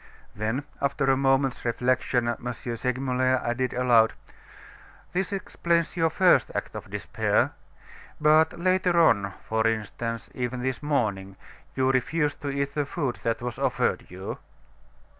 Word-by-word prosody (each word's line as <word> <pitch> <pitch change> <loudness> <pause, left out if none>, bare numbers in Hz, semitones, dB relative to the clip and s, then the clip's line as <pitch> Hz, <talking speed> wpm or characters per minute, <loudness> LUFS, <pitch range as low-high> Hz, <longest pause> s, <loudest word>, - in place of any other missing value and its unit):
Then, 110 +6 -2 0.2
after 140 -1 +1
a - - +4
moment's 135 -1 +1
reflection, 125 0 +1
M. 120 +1 -2
Segmuller 130 +1 0
added 125 +2 0
aloud: 120 -3 +4 1.0
"This 190 +1 -1
explains 170 -4 -1
your 165 -2 +2
first 180 +2 +4
act - - -3
of - - -8
despair; - - 0 0.7
but 155 +1 +4
later 185 0 +2
on, 100 - +3
for 110 0 +1
instance, 115 +1 -3
even 125 0 -3
this 130 +1 -2
morning, 105 -10 -1 0.4
you 130 0 +2
refused 145 +3 0
to 145 - -3
eat 140 0 -2
the 145 -2 -1
food 140 -6 -2
that 115 0 -2
was 120 -1 -4
offered - - 0
you." 95 +2 -6
130 Hz, 135 wpm, -26 LUFS, 120-150 Hz, 1.0 s, a